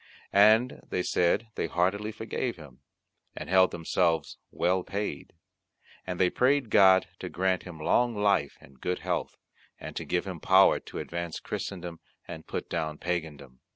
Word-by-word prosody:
And 110 Hz, +5 st, +5 dB
they 90 Hz, -, -1 dB
said 90 Hz, +7 st, +1 dB
they -, -, -2 dB
heartily 100 Hz, +5 st, 0 dB
forgave 110 Hz, +3 st, -4 dB
him, 75 Hz, -6 st, -14 dB, 0.6 s
and -, -, -7 dB
held 95 Hz, 0 st, +6 dB
themselves 80 Hz, -1 st, -1 dB
well 90 Hz, +1 st, +1 dB
paid; 100 Hz, +3 st, -5 dB, 0.7 s
and 90 Hz, -1 st, -4 dB
they 90 Hz, -, +3 dB
prayed 130 Hz, -2 st, +2 dB
God 95 Hz, -2 st, +6 dB
to -, -, -5 dB
grant 95 Hz, 0 st, 0 dB
him 85 Hz, -3 st, -10 dB
long 120 Hz, +9 st, +2 dB
life 100 Hz, -8 st, +1 dB
and 65 Hz, -1 st, -19 dB
good 90 Hz, 0 st, -1 dB
health, -, -, -3 dB, 0.4 s
and -, -, -8 dB
to -, -, -3 dB
give 90 Hz, -, -1 dB
him 95 Hz, -4 st, -6 dB
power 95 Hz, +4 st, +5 dB
to -, -, -10 dB
advance 85 Hz, -1 st, -4 dB
Christendom, 90 Hz, -3 st, -6 dB, 0.3 s
and 80 Hz, -, -9 dB
put -, -, -4 dB
down 80 Hz, -3 st, -3 dB
Pagandom. 75 Hz, -7 st, -5 dB
90 Hz, 155 wpm, -28 LUFS, 85-100 Hz, 0.7 s, held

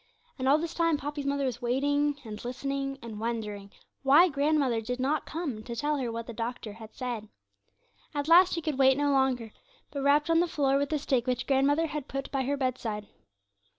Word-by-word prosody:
And 260 Hz, +1 st, +1 dB
all 285 Hz, -, +6 dB
this 330 Hz, +1 st, -4 dB
time 330 Hz, -2 st, +2 dB
Poppy's 290 Hz, 0 st, -4 dB
mother 280 Hz, 0 st, 0 dB
was 245 Hz, -1 st, -3 dB
waiting, 285 Hz, +4 st, +1 dB
and 215 Hz, -1 st, -7 dB
listening, 275 Hz, +2 st, -3 dB
and 220 Hz, -3 st, -7 dB
wondering 210 Hz, -3 st, -4 dB, 0.3 s
why 295 Hz, +7 st, +6 dB
grandmother 280 Hz, -5 st, +1 dB
did 250 Hz, +3 st, -4 dB
not 285 Hz, +4 st, 0 dB
come 300 Hz, -9 st, -4 dB
to 235 Hz, 0 st, -6 dB
tell 295 Hz, +4 st, 0 dB
her 250 Hz, -4 st, -2 dB
what 230 Hz, 0 st, -5 dB
the 235 Hz, -, -7 dB
doctor 230 Hz, -1 st, -4 dB
had 220 Hz, 0 st, -12 dB
said. 235 Hz, -4 st, -4 dB, 0.9 s
At 290 Hz, 0 st, -1 dB
last 355 Hz, +3 st, +7 dB
she 335 Hz, -, -2 dB
could 295 Hz, -3 st, -2 dB
wait 265 Hz, 0 st, +5 dB
no 290 Hz, 0 st, +2 dB
longer, 260 Hz, -5 st, +1 dB, 0.4 s
but 280 Hz, -, -4 dB
rapped 295 Hz, +3 st, +3 dB
on 330 Hz, -, +5 dB
the 350 Hz, -, +3 dB
floor 275 Hz, -4 st, +1 dB
with 285 Hz, 0 st, -1 dB
the 310 Hz, -, +1 dB
stick 265 Hz, -4 st, 0 dB
which 250 Hz, -1 st, 0 dB
grandmother 285 Hz, +4 st, +3 dB
had 300 Hz, -3 st, -5 dB
put 275 Hz, 0 st, -5 dB
by 270 Hz, -2 st, 0 dB
her 285 Hz, +2 st, 0 dB
bedside. 235 Hz, -6 st, -3 dB
275 Hz, 205 wpm, -29 LUFS, 240-290 Hz, 0.9 s, last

